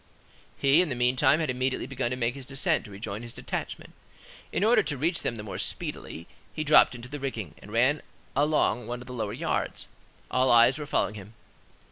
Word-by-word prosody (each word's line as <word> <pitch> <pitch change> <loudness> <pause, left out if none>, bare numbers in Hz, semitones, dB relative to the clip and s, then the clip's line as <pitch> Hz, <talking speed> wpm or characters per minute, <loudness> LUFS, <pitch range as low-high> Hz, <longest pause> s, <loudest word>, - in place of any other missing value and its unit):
He, 140 +5 +5
in 180 - 0
the 130 - -2
meantime, 125 +5 +3
had 155 -5 0
immediately 130 +1 -1
begun 130 -2 -2
to 125 - -3
make 120 -1 0
his 135 -1 -10
descent 135 -1 +1
to - - -11
rejoin 100 +1 -6
his 120 -1 -8
detachment. - - -5 0.6
In - - 0
order 225 +3 +5
to 150 -2 -3
reach 165 +6 +1
them 120 - -2
the 105 - -6
more 95 -3 -6
speedily, 85 - -3 0.3
he 155 - -3
dropped 150 -3 +6
into 120 0 -9
the 145 +3 -6
rigging, 115 - -4
and 105 - -12
ran 130 +6 +2 0.3
along 140 -6 +2
one 120 +1 -4
of - - -10
the 125 - -8
lower 110 -4 -3
yards; - - -2 0.4
all 130 0 +3
eyes 120 +4 +6
were 150 - -5
following 105 - 0
him. 105 +1 -11
125 Hz, 205 wpm, -27 LUFS, 115-140 Hz, 0.6 s, dropped